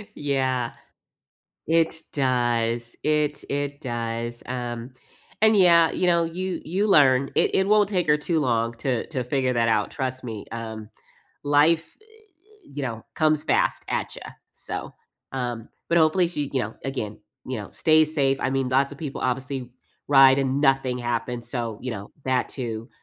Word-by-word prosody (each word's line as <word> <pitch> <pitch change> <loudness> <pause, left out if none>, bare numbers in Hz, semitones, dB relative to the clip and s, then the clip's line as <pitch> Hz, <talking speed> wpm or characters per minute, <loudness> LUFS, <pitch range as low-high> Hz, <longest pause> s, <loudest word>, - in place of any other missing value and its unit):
Yeah, 130 -4 -1 0.9
it 165 0 +1
does 120 -3 0
it 150 -1 0
it 145 0 -3
does, 120 -2 -4
um, 120 -1 -4 0.5
and 220 -1 +6
yeah, 170 -3 +6
you 180 - 0
know, 170 -1 +3
you 185 +3 -3
you 190 +6 0
learn. 140 -8 +5
It - - +2
it 190 - +3
won't 210 -1 +4
take 180 -5 0
her 150 - +4
too 160 +2 -1
long 115 -4 0
to 125 -1 -2
to 130 -5 -3
figure 130 0 0
that 115 -1 +2
out, 110 -2 +1
trust 130 -3 -4
me, 110 -4 -6
um, 110 -2 -6 0.5
life 155 +3 +3
eh - - -24
eh, 425 -4 -25
you 145 - -4
know, 115 -4 -4
comes 155 -1 +2
fast, - - +1
at - - -2
ya, - - -9 0.3
so, - - -7 0.4
um, 120 -3 -4 0.2
but 170 - +3
hopefully 165 +3 +4
she 150 -5 -3
you 135 - +1
know, 110 0 -5
again 110 -6 -4 0.3
you 130 - -2
know, 105 - -8
stays 155 -1 +3
safe. 135 -3 +2
I 130 - 0
mean, 135 -1 0
lots 135 +2 +2
of 145 - -11
people 145 -3 -5
obviously 130 0 -2 0.4
ride 135 -1 +7
and 135 +1 0
nothing 135 -3 +2
happens, 120 0 -3
so, 115 -4 -3
you 125 -1 -4
know, 105 -2 -7
that 130 -1 +1
too, 115 -2 -5
135 Hz, 170 wpm, -24 LUFS, 120-155 Hz, 0.9 s, ride